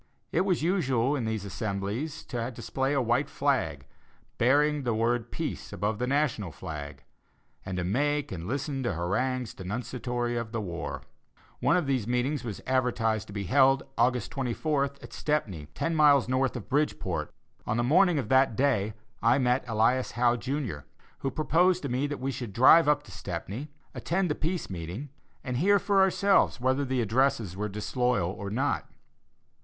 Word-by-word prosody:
It 165 - +2
was 180 -5 +1
usual 140 -7 +1
in 125 -5 -2
these 110 -2 -2
assemblages 105 +8 -3
to 120 -1 -3
display 135 +2 -2
a 140 - +2
white 120 +5 +1
flag, - - 0 0.5
bearing 145 +4 +3
the 120 -4 -1
word 115 +1 0
"Peace" - - -4
above 105 +3 -2
the 125 - -1
National 130 - 0
flag, 75 -4 -7 0.6
and 95 -1 -4
to 90 - -1
make 145 +9 0
and 85 -2 -5
listen 140 +3 -2
to 120 -5 -1
harangues 125 +8 -1
denunciatory 120 +4 -3
of 115 -1 -4
the 115 - -1
war. 85 -5 -5 0.6
One - - +3
of 175 - 0
these 130 -6 0
meetings 125 +4 0
was 110 -5 -6
advertised 120 -5 0
to 100 - -10
be 100 -1 -3
held, 135 +8 +4
August 125 +1 +1
24th, 140 +2 -1
at - - -11
Stepney, 100 - -2
ten 165 - -1
miles 145 -5 +5
north 130 +1 +1
of 120 - -6
Bridgeport. 95 - -1 0.4
On 110 - 0
the 120 - +1
morning 170 +6 +4
of 130 -6 -1
that 130 -3 +4
day, 110 -6 +1 0.3
I 115 +3 +4
met 125 -1 +2
Elias 115 +3 +1
Howe, 120 0 +3
Jr., 130 - -3 0.4
who 135 - -1
proposed 170 +5 +2
to 140 - -2
me 130 +4 0
that 145 0 -5
we 135 +1 -2
should 120 -5 -6
drive 145 - +7
up 150 0 +3
to 105 - -14
Stepney, 100 - -5 0.2
attend 180 -1 -1
the - - +3
Peace 170 +4 -2
meeting, 90 - -6 0.3
and 125 -3 -2
hear 200 +8 +4
for 200 -1 +2
ourselves 190 -4 +3
whether 130 +3 +1
the 130 -1 0
addresses 115 -3 +1
were 105 +2 -3
disloyal 105 -2 0
or 100 0 -6
not. 130 +7 -1
125 Hz, 170 wpm, -28 LUFS, 110-145 Hz, 0.6 s, drive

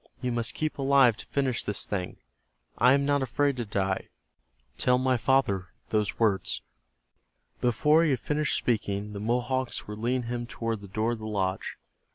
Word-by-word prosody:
"You 125 -1 -2
must 120 -1 -2
keep 155 -2 -2
alive 135 -4 +5
to - - -10
finish 130 -4 0
this 105 - -2
thing. 90 -3 -3 0.6
I 125 +3 +5
am 140 0 +2
not 145 0 +2
afraid 140 +1 +1
to 120 - -2
die. 95 -2 -1 0.7
Tell 125 0 +4
my 130 0 +2
father 115 -7 +2 0.2
those 105 -2 0
words." 100 -4 +1 1.0
Before 150 +7 +4
he 165 - +2
had 130 -4 +1
finished 150 0 0
speaking 105 -3 -1
the 100 - -5
Mohawks 125 +3 -1
were 105 - -5
leading 120 +4 -1
him 120 0 -4
toward 115 -3 -3
the 100 - -9
door 110 +4 -1
of 120 - -3
the 110 - -6
lodge. 95 -3 -2
120 Hz, 175 wpm, -28 LUFS, 105-130 Hz, 1.0 s, alive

